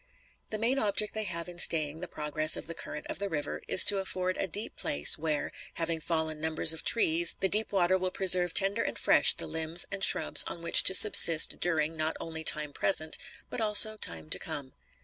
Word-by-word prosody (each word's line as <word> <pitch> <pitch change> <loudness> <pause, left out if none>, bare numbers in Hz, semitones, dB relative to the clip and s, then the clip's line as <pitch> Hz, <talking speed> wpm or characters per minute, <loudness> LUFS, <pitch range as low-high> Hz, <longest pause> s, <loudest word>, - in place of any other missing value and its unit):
The 215 - -6
main 240 +5 -2
object 210 -1 -1
they 220 -1 -4
have 170 -3 -6
in 175 -1 -11
staying 155 -2 +1
the 180 - -9
progress 155 -1 -3
of - - -9
the 165 - -8
current 150 -2 -10
of - - -7
the 200 0 -6
river 150 -4 -7
is - - +6
to 200 -1 +3
afford 185 -1 -6
a 195 - -5
deep 205 +5 -6
place 70 0 +3
where, 155 -1 -6 0.2
having 165 -1 -5
fallen 160 -1 -5
numbers 160 0 +1
of 160 - -9
trees, 170 -6 0
the 190 - -1
deep 215 +3 0
water 185 -1 -1
will 185 0 -4
preserve 180 -2 +2
tender 195 0 +1
and - - -6
fresh - - +3
the - - -8
limbs 160 +2 -3
and 195 -1 -4
shrubs - - +5
on 170 - -10
which 170 - +5
to 190 - +4
subsist 170 -6 +6
during, 165 -2 -4
not 155 0 -4
only 160 -1 -9
time 150 -2 0
present, 155 -3 -1 0.4
but - - -5
also 215 0 +5
time 80 - -8
to - - -2
come. 145 -5 -7
170 Hz, 210 wpm, -26 LUFS, 155-195 Hz, 0.4 s, is